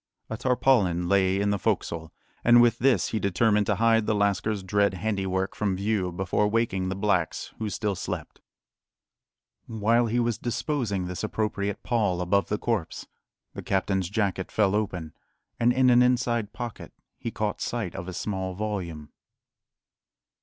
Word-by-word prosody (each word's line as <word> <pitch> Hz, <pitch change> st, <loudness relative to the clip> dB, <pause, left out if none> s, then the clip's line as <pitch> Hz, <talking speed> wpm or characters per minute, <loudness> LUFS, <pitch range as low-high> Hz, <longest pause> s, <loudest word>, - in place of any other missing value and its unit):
A 110 Hz, -, -2 dB
tarpaulin 110 Hz, -9 st, +2 dB
lay 95 Hz, 0 st, +3 dB
in 100 Hz, 0 st, +1 dB
the 100 Hz, -, 0 dB
"fo'csle," 80 Hz, -2 st, -1 dB, 0.3 s
and 120 Hz, 0 st, +7 dB
with 120 Hz, -1 st, +4 dB
this 120 Hz, -7 st, +3 dB
he 110 Hz, -, -1 dB
determined 105 Hz, +2 st, +2 dB
to 105 Hz, -, +2 dB
hide 115 Hz, +1 st, +3 dB
the 110 Hz, -, +2 dB
lascar's 100 Hz, 0 st, 0 dB
dread 100 Hz, 0 st, +1 dB
handiwork 95 Hz, -1 st, -1 dB
from 100 Hz, -3 st, -1 dB
view 100 Hz, -2 st, -1 dB
before 95 Hz, +3 st, 0 dB
waking 105 Hz, -4 st, 0 dB
the 95 Hz, -, -2 dB
blacks, 95 Hz, -4 st, -1 dB
who 110 Hz, -1 st, -2 dB
still 105 Hz, 0 st, -1 dB
slept. -, -, -6 dB, 1.3 s
While 115 Hz, +2 st, +2 dB
he 120 Hz, +2 st, 0 dB
was 120 Hz, -2 st, 0 dB
disposing 120 Hz, -, -2 dB
this 90 Hz, +2 st, -5 dB
appropriate 105 Hz, -2 st, -2 dB
pall 105 Hz, -7 st, 0 dB
above 90 Hz, +3 st, +1 dB
the 105 Hz, -, 0 dB
corpse, 110 Hz, -7 st, -2 dB, 0.5 s
the -, -, -6 dB
captain's 95 Hz, -2 st, 0 dB
jacket 100 Hz, -3 st, -1 dB
fell 105 Hz, -3 st, +2 dB
open, 90 Hz, -7 st, -2 dB, 0.5 s
and 120 Hz, +1 st, +4 dB
in 130 Hz, 0 st, +4 dB
an 120 Hz, 0 st, +6 dB
inside 120 Hz, -3 st, +1 dB
pocket 120 Hz, -1 st, -7 dB, 0.3 s
he -, -, -3 dB
caught 105 Hz, -2 st, -3 dB
sight 115 Hz, -7 st, -3 dB
of 95 Hz, -2 st, -6 dB
a 95 Hz, -, -5 dB
small 95 Hz, -1 st, -3 dB
volume. 90 Hz, -8 st, -4 dB
105 Hz, 155 wpm, -26 LUFS, 95-115 Hz, 1.3 s, and